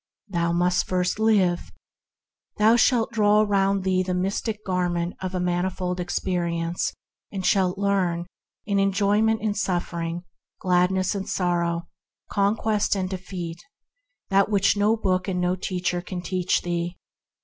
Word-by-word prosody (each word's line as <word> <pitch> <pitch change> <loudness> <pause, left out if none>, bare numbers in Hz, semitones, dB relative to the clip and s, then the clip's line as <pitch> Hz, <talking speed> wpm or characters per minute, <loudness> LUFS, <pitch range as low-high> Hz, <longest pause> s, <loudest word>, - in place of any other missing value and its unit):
Thou 170 -2 0
must 175 +1 +1
first 180 +2 0
live; 195 -6 +2 0.9
thou 220 +2 +5
shalt 235 -1 +3
draw 210 -1 +4
around 195 -2 +2
thee 185 -1 +2
the 185 0 -1
mystic 205 +3 -2
garment 175 -2 -1
of 185 0 -3
a - - 0
manifold 180 0 -1
experience, 170 -1 -1 0.4
and 190 -2 -4
shalt 190 -1 +2
learn, 190 -4 0 0.4
through 200 -1 +1
enjoyment 205 +3 +2
and 210 -2 0
suf 185 -4 -1
fering, 170 0 -3 0.4
gladness 185 0 +2
and 195 -1 -4
sorrow, 170 -2 0 0.4
conquest 210 +1 +1
and 185 -1 -2
defeat, 180 -3 -5 0.7
what 195 +2 +3 0.2
neither 210 +2 +2
book 185 -3 0
nor 180 -1 0
teacher 180 -1 -2
can 180 0 -6
teach 180 +1 0
thee. 175 0 -2
185 Hz, 130 wpm, -24 LUFS, 175-200 Hz, 0.9 s, thou